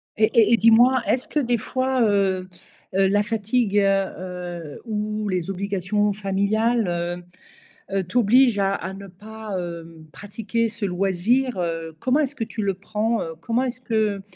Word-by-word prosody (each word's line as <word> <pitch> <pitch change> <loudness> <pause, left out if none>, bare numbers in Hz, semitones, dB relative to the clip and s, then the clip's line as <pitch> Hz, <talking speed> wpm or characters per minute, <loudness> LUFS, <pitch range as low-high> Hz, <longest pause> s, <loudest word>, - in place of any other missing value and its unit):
Et 215 0 +2
et 225 +1 +5
et 230 - +6
dis-moi, 240 +3 +5
est-ce 255 - 0
que 300 - 0
des 245 -4 +1
fois, 260 +3 -1
heu, 195 -4 +2 0.5
heu, 195 0 +4
la 205 +2 +2
fatigue, 220 0 0
heu, - - +6 0.8
heu, 150 -2 -9
ou 215 -1 -3
les 180 -2 -2
obligations 200 +1 -1
familiales, 210 +3 0
heu, 175 0 -3 0.7
heu, 195 - +1
t'obligent 240 +3 +4
à 195 0 +1
à 190 - -4
ne 200 0 -10
pas, 215 +2 -8
heu, 165 -2 -7
pratiquer 225 +3 -2
ce 225 -1 -6
loisir, 195 +6 0
heu, 165 -2 -3
comment 260 +4 +2
est-ce 290 -1 -1
que 230 -6 -3
tu 220 - -5
le 195 -1 0
prends, 215 +4 -1
heu? 165 - -5
Comment 235 +6 0
est-ce 250 -1 -4
que 215 -5 0
210 Hz, 165 wpm, -23 LUFS, 190-230 Hz, 0.8 s, et